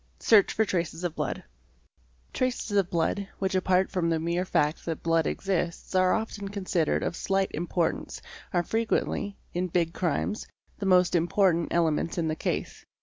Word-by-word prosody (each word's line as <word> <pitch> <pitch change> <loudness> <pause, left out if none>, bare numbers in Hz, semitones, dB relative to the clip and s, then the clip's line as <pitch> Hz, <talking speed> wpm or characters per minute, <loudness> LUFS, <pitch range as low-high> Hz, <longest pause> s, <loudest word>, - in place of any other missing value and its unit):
Search 215 -3 +5
for 220 - +1
traces 170 -3 -2
of 175 -3 -1
blood - - -3 0.9
"%—*™, - - -34
Traces 255 -3 -1
of 195 -3 +3
blood, 175 +4 0
which 190 -1 -1
apart 185 0 +2
from 170 -3 0
the 165 -1 +1
mere 170 +3 -1
fact 150 -3 +1
that 165 -2 -4
blood 165 -1 +2
exists 180 -3 -2
are 185 0 +4
often 220 -2 -3
considered 185 -5 0
of - - -2
slight 195 +1 0
importance, 170 0 -2 0.3
are 175 -1 +1
frequently, 220 -1 -1 0.2
especially 175 - -2
in 185 - 0
big 170 -1 0
crimes, 185 +4 -1 0.3
the 200 - -2
most 180 -1 +4
important 175 0 +2
elements 165 0 +1
in 165 -2 0
the 155 - -1
case. - - -3
180 Hz, 170 wpm, -27 LUFS, 170-195 Hz, 0.9 s, Search